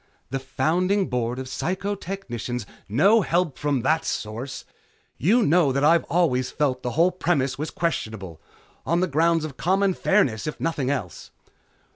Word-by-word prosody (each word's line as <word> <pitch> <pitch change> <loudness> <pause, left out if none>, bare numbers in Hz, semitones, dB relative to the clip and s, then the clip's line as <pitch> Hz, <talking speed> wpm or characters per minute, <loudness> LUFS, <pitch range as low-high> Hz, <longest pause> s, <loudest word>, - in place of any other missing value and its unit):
"The 135 - -1
founding 175 +9 0
board 120 -1 -1
of 130 - -4
Psychotechnicians 180 - -4 0.2
" - - -36
"No 215 +3 +6
help 170 -4 0
from 145 -3 0
that 160 +4 +2
source. 115 +5 -4 0.5
You 220 - +4
know 165 -5 +4
that 140 +2 0
I've 165 +2 +4
always 135 -8 +1
felt 140 -4 -1
the 125 - -3
whole 175 +3 +5
premise 140 -7 0
was 155 - -2
questionable. 110 - -3 0.4
On 170 +2 +1
the - - +3
grounds 165 +1 +2
of 145 -4 -8
common 190 +2 +2
fairness, 140 - +1
if 150 - -5
nothing 150 -6 -1
else." 120 - -4
150 Hz, 155 wpm, -24 LUFS, 130-180 Hz, 0.5 s, No